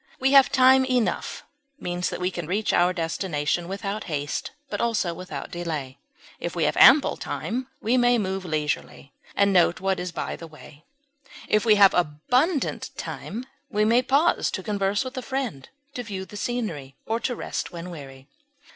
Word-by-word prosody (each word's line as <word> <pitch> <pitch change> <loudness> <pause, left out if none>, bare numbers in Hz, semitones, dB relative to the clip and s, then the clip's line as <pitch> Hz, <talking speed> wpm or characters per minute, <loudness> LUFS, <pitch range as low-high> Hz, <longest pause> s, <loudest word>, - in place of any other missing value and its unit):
We 265 +1 +2
have 275 -2 +7
time 260 0 +6
enough, 250 -3 -1 0.4
means 180 0 -2
that - - -5
we 180 +1 -1
can 175 -4 -5
reach 205 +5 0
our 180 +1 +4
destination 165 -2 -2
without 200 +2 -4
haste, 145 -3 -3 0.2
but - - -3
also 225 -7 0
without 165 -5 -7
delay; 155 -7 -5 0.4
if - - -4
we - - 0
have - - +1
ample - - +7
time, 240 +10 -4
we 235 +4 +2
may 245 0 +4
move 190 -3 -2
leisurely, 150 -3 -3 0.2
and 200 0 +3
note 175 -1 +4
what 190 0 0
is 180 0 -4
by - - -4
the 165 - -10
way; 155 -1 -15 0.6
if 215 +1 +2
we 215 -2 +6
have 200 -2 +7
abundant 250 - 0
time, 235 +5 -6 0.2
we 210 +1 +1
may 235 +3 +4
pause 280 +6 +2
to 190 - -4
converse 200 +1 0
with 255 +1 -7
a - - -2
friend, 250 - -4 0.2
to 245 - -4
view 195 -5 -6
the 210 - -13
scenery, 200 - -4
or 225 +1 -1
to 245 +1 -2
rest - - -4
when 175 +1 -7
weary. 135 -4 -11
195 Hz, 175 wpm, -25 LUFS, 165-240 Hz, 0.6 s, have